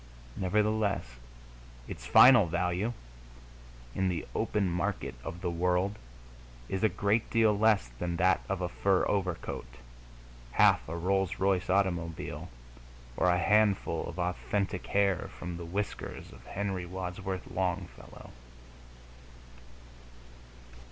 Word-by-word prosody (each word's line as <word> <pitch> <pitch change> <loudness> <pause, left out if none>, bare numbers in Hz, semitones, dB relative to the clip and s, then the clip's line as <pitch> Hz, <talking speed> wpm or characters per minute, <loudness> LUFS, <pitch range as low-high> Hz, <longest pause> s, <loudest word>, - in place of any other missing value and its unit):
Nevertheless, 105 - +1 0.8
its 60 - -8
final 115 - +8
value, 90 +6 -1 1.0
in 95 0 0
the 85 -3 -3
open 100 -2 0
market 90 +3 -2
of 85 - -7
the 90 -2 -1
world, 90 +3 +1 0.7
is 95 +1 -3
a 110 - +5
great 105 +3 0
deal 110 -2 +3
less 105 - +3
than 85 -1 -2
that 90 +2 +3
of 95 -1 -2
a 90 - 0
fur 95 +2 +1
overcoat, 90 -10 -2 0.9
half - - +4
a 85 - -4
Rolls 95 +1 0
Royce 95 -1 +1
automobile, 85 -4 -1 0.7
or 90 - +2
a 90 - +3
handful 100 -3 +2
of 85 - -8
authentic 95 +2 -2
hair 100 -3 +1
from 90 -1 -5
the 85 - -7
whiskers 100 +4 -5
of - - -15
Henry 95 -2 -3
Wadsworth 95 +1 -5
Longfellow. 90 -1 -4
95 Hz, 115 wpm, -30 LUFS, 90-100 Hz, 1.0 s, final